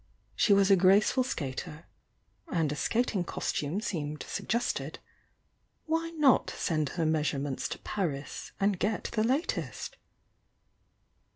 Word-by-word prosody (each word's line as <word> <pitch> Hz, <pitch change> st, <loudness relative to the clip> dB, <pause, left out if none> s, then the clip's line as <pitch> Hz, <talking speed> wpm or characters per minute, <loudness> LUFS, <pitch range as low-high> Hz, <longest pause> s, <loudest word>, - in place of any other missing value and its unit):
She -, -, +3 dB
was 200 Hz, 0 st, +5 dB
a -, -, +9 dB
graceful 195 Hz, +7 st, +4 dB
skater 155 Hz, -, -5 dB, 0.3 s
— -, -, -42 dB, 0.3 s
and 160 Hz, -4 st, +1 dB
a -, -, -2 dB
skating 220 Hz, +2 st, 0 dB
costume 165 Hz, +1 st, -2 dB
seemed 150 Hz, -7 st, -3 dB
suggested 235 Hz, +2 st, -2 dB, 0.5 s
— -, -, -45 dB
why 330 Hz, +1 st, 0 dB
not 300 Hz, -7 st, +4 dB
send 155 Hz, -5 st, -1 dB
her 165 Hz, -, +1 dB
measurements 145 Hz, -3 st, 0 dB
to -, -, -4 dB
Paris 150 Hz, -9 st, -4 dB
and 200 Hz, -2 st, +2 dB
get 210 Hz, +2 st, -1 dB
the 215 Hz, -2 st, +1 dB
latest? 265 Hz, +8 st, -1 dB
190 Hz, 125 wpm, -30 LUFS, 150-225 Hz, 0.5 s, a